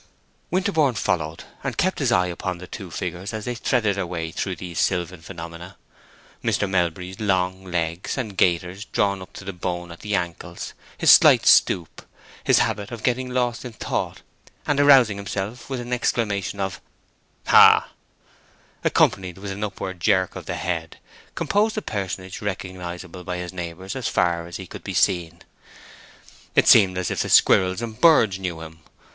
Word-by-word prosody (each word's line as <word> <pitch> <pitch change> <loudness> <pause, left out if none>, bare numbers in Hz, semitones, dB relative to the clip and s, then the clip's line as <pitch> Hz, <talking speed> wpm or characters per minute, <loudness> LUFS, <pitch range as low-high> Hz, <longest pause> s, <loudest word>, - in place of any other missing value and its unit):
Winterborne 160 - +1
followed, 80 -5 -2 0.2
and - - -3
kept - - +1
his - - +1
eye 90 - +3
upon 90 +1 -4
the 90 - -9
two 95 0 -8
figures 90 +4 -5
as 110 - -5
they 125 - -2
threaded 115 -4 0
their 95 -2 -2
way 85 -2 -4
through 95 +3 -3
these 85 0 -6
sylvan 90 -2 -1
phenomena. 85 +2 -9 0.7
Mr. 105 - +1
Melbury's 90 0 -1
long 95 -2 0
legs, 85 +2 -2
and 110 -7 -4
gaiters 90 +2 +1
drawn 100 -2 0
in 95 - -9
to - - -9
the 95 +1 -5
bone 90 -1 -4
at 85 - -11
the 105 -1 -2
ankles, 85 -3 -4 0.2
his - - +6
slight - - +7
stoop, 85 -3 +4 0.4
his - - +4
habit 100 -1 0
of 115 -3 -8
getting 125 +1 0
lost 125 -2 -1
in 125 -2 -7
thought - - -3 0.4
and 145 -1 +1
arousing 135 -8 +6
himself 100 +4 -5
with 135 -2 -3
an 120 +1 -5
exclamation 105 -5 -1
of 95 -1 -3 0.6
"Hah!" - - +7 0.9
accompanied 95 -2 +2
with 100 0 -6
an 100 +2 -5
upward 95 -2 -5
jerk 95 -1 +2
of - - -8
the - - -3
head, 80 -2 -3 0.4
composed 215 +2 +1
a - - 0
personage 95 -2 -5
recognizable 90 -2 -6
by 90 0 -4
his 90 0 -6
neighbors 90 +3 -6
as 130 -4 -2
far 85 -1 0
as 85 - -7
he 95 - -8
could - - -10
be 95 - -5
seen. 85 -2 +1 1.1
It - - +4
seemed 95 -4 +6
as 95 - -1
if - - -1
the - - -2
squirrels 95 +4 +4
and 110 -2 -7
birds 110 - +5
knew 90 -4 -4
him. 80 0 -10
95 Hz, 170 wpm, -23 LUFS, 90-105 Hz, 1.1 s, slight